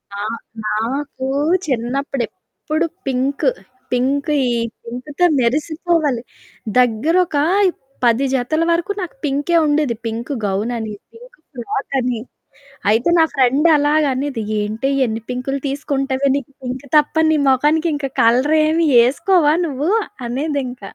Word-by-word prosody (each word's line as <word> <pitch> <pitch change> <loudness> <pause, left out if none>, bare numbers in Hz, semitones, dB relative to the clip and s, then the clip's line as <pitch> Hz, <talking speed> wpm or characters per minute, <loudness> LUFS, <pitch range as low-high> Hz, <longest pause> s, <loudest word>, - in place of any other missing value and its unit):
ఆ! - - -6 0.5
నాకు 260 +5 -2 0.4
చిన్నప్పుడెప్పుడు 275 +5 -3 0.2
pink. 270 - +1 0.4
Pink 275 +4 0 0.2
ఈ 245 - +1 0.3
పింకుతో 270 +8 -2
మెరిసిపోవాలి. 300 +1 0 0.6
దగ్గరొక 300 +9 +2 0.7
10 235 +3 +3
జతల 285 +6 0
వరకు 340 +4 0
నాకు 350 - -6
పింకే 290 +4 0
ఉండేది. 290 -5 +1
పింకు 230 +5 -3
గౌనని, 215 +2 -2 0.2
పింకు - - -16
ఫ్రాకని 250 -1 -2 0.7
అయితే 230 +9 +3
నా 325 - +6
ఫ్రెండు 270 +4 +3
అలాగనేది, 285 -4 +1 0.2
"ఏంటే 215 +5 -2 0.2
ఎన్ని 225 0 -3
పింకులు 255 +2 -2
తీసుకుంటవే? 275 -1 -1
నీకు 280 -1 -4
పింకు 255 +2 -5
తప్ప 295 +1 +2
నీ 315 - +3
మొఖానికి 300 +5 +2
ఇంక 280 -1 -3
కలరేమి 310 +7 +3 0.2
ఏసుకోవా 305 +4 +3
నువ్వు." 290 +2 -2 0.4
అనేదింక. 260 -2 -3
275 Hz, 105 wpm, -19 LUFS, 245-305 Hz, 0.7 s, నా